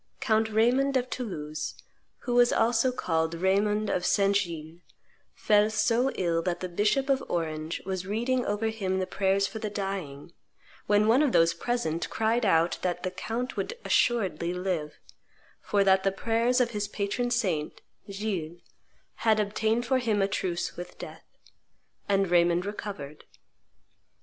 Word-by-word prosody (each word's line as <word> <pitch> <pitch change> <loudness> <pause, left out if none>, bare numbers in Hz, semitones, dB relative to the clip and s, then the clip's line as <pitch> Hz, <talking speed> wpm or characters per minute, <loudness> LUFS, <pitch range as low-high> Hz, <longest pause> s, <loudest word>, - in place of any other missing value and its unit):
Count 220 0 +1
Raymond 250 +5 +2
of 255 0 -3
Toulouse, 155 -11 -5 0.5
who 245 - -3
was 245 0 +5
also 235 +2 +2
called 160 -8 -1
Raymond 205 +4 +1
of 180 - -1
Saint 200 +1 +2
Gilles, 170 -4 -3 0.6
fell 210 0 +3
so 230 +4 +2
ill 170 -2 0
that 175 0 -2
the 185 - -4
bishop 210 +9 +1
of 270 -1 +1
Orange 160 -1 -3
was 185 -1 -4
reading 240 +5 0
over 210 +1 -1
him 195 -4 -2
the 190 - 0
prayers 195 +1 +1
for 220 - -5
the 215 -1 -3
dying, 190 -7 -5 0.5
when 210 +1 +3
one 240 +5 +5
of 290 -5 +2
those 165 0 +4
present 170 -4 -2
cried 225 +1 +1
out 165 -1 +2
that 180 -1 -2
the 185 - -2
count 225 +7 -4
would 480 - -3
assuredly 190 -7 +1
live, 180 -5 -3 0.7
for 200 -1 +1
that 190 -1 +4
the 195 - +1
prayers 230 +5 +1
of 240 -2 +2
his 210 -2 -2
patron 210 +4 -2
saint, 185 -11 -1 0.3
Gilles, 195 -5 -4 0.6
had 220 -1 +2
obtained 220 +3 0
for 260 +2 +2
him 225 -4 0
a - - +2
truce 180 -3 -2
with 175 0 -9
death. - - -10 0.8
And 195 -1 +2
Raymond 175 +1 +3
recovered. 200 -8 -7
200 Hz, 155 wpm, -28 LUFS, 175-225 Hz, 0.8 s, was